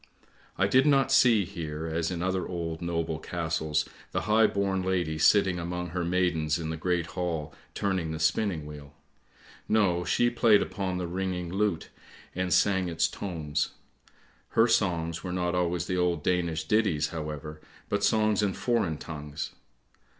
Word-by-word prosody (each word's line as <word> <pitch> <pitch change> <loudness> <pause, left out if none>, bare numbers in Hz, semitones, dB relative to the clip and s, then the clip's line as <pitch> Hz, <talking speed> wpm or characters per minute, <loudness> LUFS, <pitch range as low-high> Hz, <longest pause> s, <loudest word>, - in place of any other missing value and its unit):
" - - -31
I 95 - +3
did 130 +8 +4
not 135 -2 +4
see 115 -6 +5
here, 80 -4 -5
as 80 0 -1
in 90 -1 -3
other 95 -1 -1
old 85 -2 -4
noble 85 -2 -2
castles, 80 -3 -1 0.3
the - - 0
high 110 +1 +4
born 100 -1 0
lady 90 -4 -1
sitting 95 0 +4
among 90 +1 -4
her 90 +1 -2
maidens 85 -3 +1
in 80 -1 -4
the - - -3
great 90 +1 0
hall 85 -4 -3 0.2
turning 95 -5 -1
the 80 - -3
spinning 85 0 0
wheel. 75 -1 -10 0.7
No, 90 -5 +2
she 120 +7 +2
played 115 -3 +4
upon 95 -3 -3
the 90 - -2
ringing 90 -1 -3
lute, 100 -4 0 0.4
and 90 0 -2
sang 95 +1 +3
to 85 - -4
its 80 - +2
tones. 80 -7 -3 0.8
Her 115 - +6
songs 85 -8 0
were 90 - -4
not 90 -1 -1
always 90 -1 0
the 90 - -2
old 90 -4 +1
Danish 85 -3 0
ditties, 80 -6 +1
however, 75 -1 -6 0.3
but 100 0 -1
songs 110 0 +3
in 100 -3 0
foreign 115 -10 0
tongues. 75 -2 -6
90 Hz, 165 wpm, -28 LUFS, 80-95 Hz, 0.8 s, Her